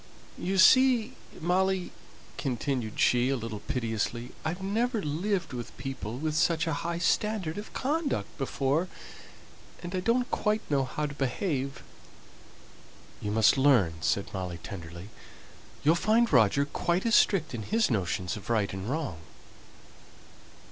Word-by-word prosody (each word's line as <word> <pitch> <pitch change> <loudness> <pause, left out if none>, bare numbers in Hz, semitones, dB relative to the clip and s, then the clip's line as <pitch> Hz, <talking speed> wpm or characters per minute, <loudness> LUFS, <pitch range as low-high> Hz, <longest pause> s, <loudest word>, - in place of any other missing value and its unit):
You 190 +2 -1
see, 255 +3 +6 0.3
Molly," 185 +2 +1 0.4
continued 125 -4 -2
she, 125 +1 +3
a 135 - +1
little 110 -3 -5
piteously, 115 +1 -3
"I've 160 +4 -2
never 225 +4 0
lived 175 +4 -1
with 120 -2 -7
people 130 -4 -5
with 155 +2 -2
such 160 0 +2
a 165 - -1
high 170 0 -2
standard 195 -1 0
of 210 - -9
conduct 295 +2 -1
before; 140 +5 0 1.0
and 175 +1 -6
I 185 - 0
don't 235 +6 +1
quite 210 +1 +1
know 135 -2 +2
how 150 +4 -3
to 145 - -5
behave." 135 0 -2 1.4
"You 105 - -3
must 110 +5 +4
learn," 125 - +4
said 100 +4 0
Molly 90 -3 -4
tenderly. 85 +3 -8 0.7
"You'll 155 - +5
find 220 +4 +2
Roger 125 +3 +4
quite 170 +6 -1
as 230 - +1
strict 160 -12 +4
in 115 - -4
his 220 - +1
notions 90 -3 -1
of 105 - -10
right 110 -5 +1
and 95 +3 -5
wrong." 140 - -3
145 Hz, 140 wpm, -28 LUFS, 115-190 Hz, 1.4 s, see